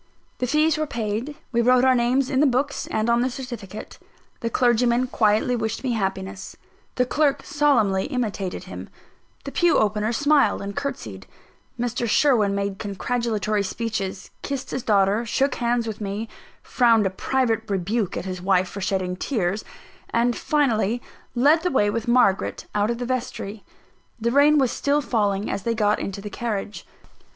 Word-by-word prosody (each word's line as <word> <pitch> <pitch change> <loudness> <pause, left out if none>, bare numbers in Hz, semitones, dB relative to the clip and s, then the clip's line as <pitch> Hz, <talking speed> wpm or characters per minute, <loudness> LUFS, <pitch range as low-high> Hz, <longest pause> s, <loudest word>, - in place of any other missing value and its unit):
The 250 - 0
fees 305 +3 +2
were 310 - -1
paid; 235 +3 -3 0.2
we 235 -1 +2
wrote 250 +2 +4
our 260 - +5
names 250 +2 +1
in 265 - +2
the 295 - +5
books 270 +2 -1
and 220 +1 -1
on 235 0 +3
the 255 - +1
certificate; 240 -6 -8 0.4
the 230 - -2
clergyman 240 +1 +2
quietly 220 0 +2
wished 225 0 -3
me 260 - 0
happiness; 190 -2 -3 0.4
the 250 - +2
clerk 290 +2 +1
solemnly 225 -10 +2
imitated 210 -9 -3
him; 185 - -9 0.5
the - - -6
pew 345 -2 +3
opener 215 +1 +1
smiled 285 -2 +3
and 200 0 -5
curtseyed; 110 - -5 0.5
Mr. 240 -1 -1
Sherwin 215 -7 +3
made 200 0 -2
congratulatory 215 0 -1
speeches, 200 -2 -4
kissed 275 -2 -4
his 260 - -2
daughter, 205 0 +2
shook 270 +3 0
hands 240 -1 0
with 220 -1 -5
me, 205 +2 -3 0.4
frowned 230 -4 +3
a 190 - +1
private 225 +1 -1
rebuke 200 +2 -1
at - - -4
his 185 -1 -5
wife 185 -1 +2
for 200 - -7
shedding 185 -1 -1
tears, 195 -2 -1 0.5
and, 235 +1 +1
finally, 240 -7 +1 0.4
led 290 +7 +4
the 360 - 0
way 205 -8 +2
with 230 +1 -3
Margaret 235 -5 +2
out 210 +1 +1
of 235 - -1
the 245 - -4
vestry. 235 -4 -4 0.6
The 235 +1 0
rain 290 +3 +5
was 265 -4 +3
still 285 +1 +1
falling, 205 -6 0
as - - -2
they 230 +3 -1
got 210 -1 +2
into 195 0 -5
the 205 0 -7
carriage. 215 -3 -4
230 Hz, 165 wpm, -23 LUFS, 200-255 Hz, 0.6 s, our